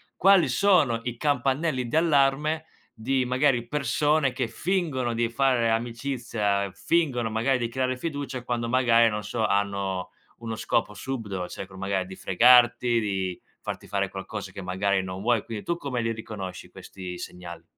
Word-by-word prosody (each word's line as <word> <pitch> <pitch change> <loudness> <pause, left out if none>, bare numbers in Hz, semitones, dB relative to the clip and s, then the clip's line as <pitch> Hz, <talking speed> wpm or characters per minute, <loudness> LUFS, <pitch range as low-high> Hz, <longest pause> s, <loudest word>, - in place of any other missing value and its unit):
quali 195 -1 +5
sono 150 - +3
i 120 -1 -4
campanelli 135 0 0
di 115 - -3
allarme 155 0 +2 0.3
di 130 +3 -1
magari 125 -1 +1
persone 145 +1 +1
che 125 -2 -1
fingono 155 -8 -1
di 115 0 0
fare 125 -2 +2
amicizia, 115 -4 -1
fingono 140 -9 0
magari 120 +4 +1
di 120 -1 -2
creare 130 +1 -1
fiducia, 140 -3 -4
quando 120 -1 -2
magari, 115 -2 +4
non 105 -1 -3
so, 110 +2 -1
hanno 100 -2 -1 0.3
uno 115 -1 -5
scopo 105 - 0
subdolo, 105 -6 -4
cercano 95 0 -9
magari 95 -1 -1
di 95 - -9
fregarti, 120 +3 +5
di 95 -4 -2 0.2
farti - - -6
fare - - -1
qualcosa - - -6
che 100 - -8
magari 95 +1 0
non 95 0 -6
vuoi; 115 0 +2
quindi 110 -3 -6
tu 170 - -1
come 135 -7 -3
li 115 0 -1
riconosci 105 -4 -7
questi 90 -2 -8
segnali? 85 -1 -8
120 Hz, 155 wpm, -26 LUFS, 105-135 Hz, 0.3 s, quali